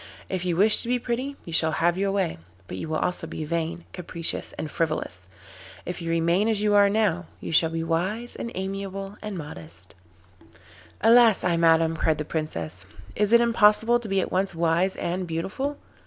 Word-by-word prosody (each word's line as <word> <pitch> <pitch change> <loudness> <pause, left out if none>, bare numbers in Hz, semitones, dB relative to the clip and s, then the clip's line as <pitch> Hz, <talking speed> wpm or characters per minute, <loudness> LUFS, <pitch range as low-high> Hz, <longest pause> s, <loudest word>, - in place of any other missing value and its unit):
If 185 -1 -3
you 175 -2 0
wish 210 +4 +5
to - - -1
be 250 +1 +2
pretty 250 +3 -3
you 170 - -7
shall 160 -1 +2
have 170 +2 +2
your 195 +1 0
way, 190 - -1 0.3
but 90 - -6
you 155 - -5
will 155 - 0
also 175 -1 -2
be 155 - -5
vain, 170 +1 -3
capricious, 170 -2 -2
and 155 - -6
frivolous. 120 - -2 0.6
If 180 0 -5
you 165 - -4
remain 170 +5 +2
as 220 -2 +1
you 210 0 +2
are 200 -1 +6
now, 200 -5 +1
you - - -6
shall 160 0 +4
be 165 0 -3
wise 190 +9 -2
and 235 - -5
amiable 195 +1 -5
and 210 -3 -5
modest.' 90 - -7 1.1
'Alas 230 -1 +6
I 175 - +2
madam,' 165 -1 +4
cried 160 -1 +1
the 150 - -4
Princess, 95 - -4 0.3
'is 210 0 +1
it 235 0 +7
impossible 230 0 +4
to 230 -3 -7
be 195 0 +2
at - - -2
once 190 0 +1
wise 170 +3 +2
and 180 +1 -3
beautiful? 195 - -3
180 Hz, 190 wpm, -25 LUFS, 165-210 Hz, 1.1 s, it